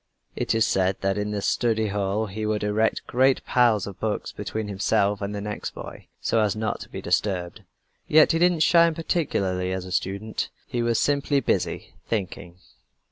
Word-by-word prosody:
It - - -1
is 110 0 +3
said 95 0 +1
that 95 +1 0
in 105 0 -2
the 105 -1 -3
study 110 -2 +1
hall 100 +2 -1
he 110 +1 -5
would 105 -1 -1
erect 105 +2 +1
a - - -12
great 130 +1 +3
pile 120 -3 +4
of 100 -2 -9
books 110 -1 -2
between 110 -1 -4
himself 100 0 +1
and 100 +1 -3
the 100 - -4
next 105 0 -5
boy, - - -9
so 115 - +1
as 105 -2 +1
not 110 0 -2
to - - -10
be - - -7
disturbed. 90 -1 -1 0.5
Yet 155 0 +6
he 165 - +1
didn't 175 -2 +3
shine 170 0 +5
particularly 95 - -1
as 95 -1 -3
a 90 - -9
student. 100 +4 -2 0.2
He 120 - -2
was 115 -1 +1
simply 145 0 +2
busy 135 - -1
thinking. 90 -4 -4
105 Hz, 190 wpm, -25 LUFS, 100-120 Hz, 0.5 s, Yet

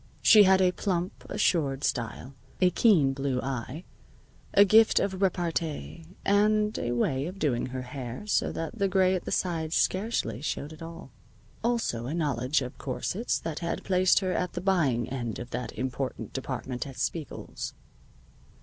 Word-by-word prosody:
She 215 - +8
had 190 0 +5
a 180 - +4
plump, 180 -1 -3
assured 150 -9 +1
style, 120 +1 -2 0.3
a 180 -1 +4
keen 165 - +4
blue 135 -1 -1
eye, 130 +4 -4 0.7
a 200 - +7
gift 220 +3 +6
of 190 -1 -2
repartee, 165 -3 -2 0.2
and 210 +1 +3
a 120 - -1
way 130 +4 0
of 185 +3 -7
doing 135 -10 0
her 130 0 -5
hair 125 - -7
so 210 - +1
that 165 +8 -5
the 200 - +3
gray 185 0 +3
at 185 - -2
the - - -4
sides 165 -3 -1
scarcely 185 - 0
showed 150 0 -3
at 155 - -14
all. 165 +2 -9 0.5
Also 230 - 0
a 150 - -3
knowledge 140 -3 0
of 125 - -8
corsets 180 - -2
that 160 -2 -4
had 170 -1 -3
placed 185 0 +3
her 185 -1 -1
at 180 0 -1
the - - -3
buying 155 - +1
end 120 -4 -4
of 120 0 -8
that 125 +1 -4
important 130 +1 -4
department 130 0 -4
at 135 - -10
Spiegel's. 160 -4 -4
160 Hz, 165 wpm, -28 LUFS, 130-190 Hz, 0.7 s, She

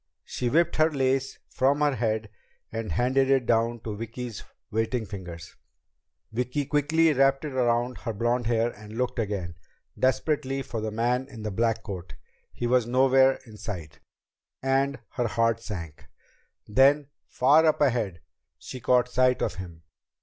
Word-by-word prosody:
She 125 - -3
whipped 165 +4 +2
the 155 - +7
lace 135 -2 0
from 140 +3 +1
her 145 -1 +3
head 110 -3 -1 0.4
and 115 -4 -4
handed 130 - +2
it 135 -2 +3
down 115 0 +1
to 110 -2 -5
Vicki's 115 +1 -6 0.3
waiting 110 +2 -1
fingers. 90 -4 -9 0.8
Vicki 125 +5 -1
quickly 155 +3 +3
wrapped 135 +1 +3
it 145 - -5
around 120 -1 +1
her 115 - -3
bright 105 - -9
blond 120 0 +1
hair 115 0 +1
and 105 +1 -11
looked 125 0 -1
again, 100 -6 -2 0.5
desperately, 135 0 0
for 115 -4 -5
the 110 - -2
man 120 +4 0
in 115 -5 -9
the 105 - -3
black 115 +2 0
cloak. 90 -5 -7 0.3
He 120 - -4
was 120 -1 +2
nowhere 130 +1 +4
in 110 -3 -13
sight, 85 -9 -7 0.6
and 135 +1 +1
her 120 -2 -1
heart 115 0 +1
sank. 85 -9 -7 0.6
Then, 140 +5 +4 0.2
far 145 +5 +4
up 155 - +2
ahead, 115 - +1 0.4
she 130 - -8
caught 125 +1 +3
sight 125 0 +2
of - - -1
him. 85 -3 -11
120 Hz, 155 wpm, -26 LUFS, 110-135 Hz, 0.8 s, the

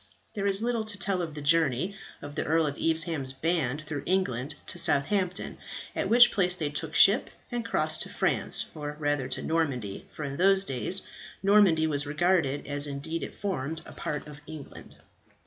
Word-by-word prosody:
There 200 -1 -1
is 200 +2 +3
little 235 -2 0
to 210 -1 -6
tell 190 0 0
of 160 -3 -5
the 150 - -6
journey 160 +3 +2 0.3
of 145 0 -7
the - - -2
Earl 160 +1 +2
of 145 -1 -2
Evesham's 160 -5 -1
band 155 -1 -1
through 150 -2 -5
England 150 -8 -1
to - - -3
Southampton, 180 +6 +1 0.4
at - - -1
which 240 +1 +8
place 180 -3 +3
they 150 -5 -3
took 155 +1 -4
ship 205 +6 +6 0.2
and 240 -1 -2
crossed 155 -8 0
to - - -2
France - - 0
or 150 -1 -6
rather 145 -3 0
to - - -4
Normandy, 135 -11 -2
for 150 - -8
in 140 -1 -4
those 195 +1 +4
days 155 +8 +2 0.4
Normandy 195 -6 +5
was 145 -2 0
regarded, 155 -2 +1
as 145 0 -1
indeed 145 +4 -4
it - - -6
formed, 160 -5 -3
a - - -11
part 150 - -4
of 150 -1 -11
England. 155 -2 -10
160 Hz, 180 wpm, -28 LUFS, 145-185 Hz, 0.4 s, which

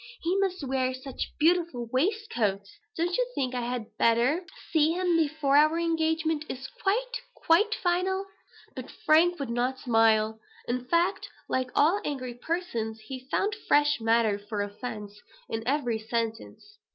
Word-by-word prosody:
He 345 +3 +1
must 375 -4 -1
wear 260 -1 0
such 260 0 -6
beautiful 325 -7 +2
waistcoats! 250 - 0 0.3
Don't 345 +2 0
you - - +1
think 255 -2 -1
I 250 - -1
had 240 -2 -4
better 240 +9 +3 0.3
see 315 0 +3
him 360 -1 +1
before 310 -3 +1
our 310 +2 +5
engagement 320 -2 0
is 265 +1 -5
quite, - - 0
quite 420 +7 +3
final?" 375 +2 0 0.5
But - - -7
Frank 335 +2 +3
would 275 -4 -3
not 250 +2 0
smile. 220 -2 +3 0.3
In 250 +1 -2
fact, 345 +7 +1 0.2
like 255 -1 -1
all 340 +8 +4
angry 255 -4 -4
persons, 240 -6 -3
he 260 +3 -8
found 410 +7 +1
fresh 295 -1 +4
matter 225 -2 +2
for 205 0 -3
offence 210 -1 -7 0.3
in 225 - -3
every 250 -5 0
sentence. 230 - -4
275 Hz, 145 wpm, -28 LUFS, 235-340 Hz, 0.5 s, our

